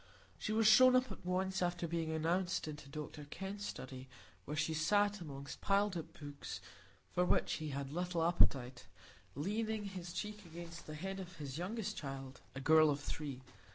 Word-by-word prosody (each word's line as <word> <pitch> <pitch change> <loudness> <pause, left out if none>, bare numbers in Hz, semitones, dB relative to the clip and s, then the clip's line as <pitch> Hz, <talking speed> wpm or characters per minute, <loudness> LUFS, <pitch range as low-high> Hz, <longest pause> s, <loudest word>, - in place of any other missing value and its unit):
She - - -2
was 220 +1 +3
shown 255 +4 +9
up 255 -3 +3
at 195 - -8
once, 185 +1 0
after 175 -1 0
being 165 -1 -1
announced, 170 +3 +1
into 150 -2 -7
Dr 150 0 -6
Kenn's 195 +6 -5
study, 130 0 -7 0.4
where 150 +2 -3
he 155 +1 +1
sat 205 +5 +3
amongst 140 -3 -7
piled 200 0 +3
up 165 -1 -6
books, 145 -1 -6 0.5
for 180 - +3
which 180 - +3
he 155 -1 -4
had 140 0 -4
little 175 -1 0
appetite, 130 - +3 0.5
leaning 215 - -1
his 185 -3 -5
cheek 210 +2 -4
against 170 0 -9
the 155 - -5
head 190 +5 -4
of 185 -1 -7
his 145 0 -5
youngest 210 +3 -2
child, 135 -2 -6
a - - -3
girl 155 +2 +6
of 145 -1 +1
three. 140 -2 -5
170 Hz, 175 wpm, -37 LUFS, 145-195 Hz, 0.5 s, shown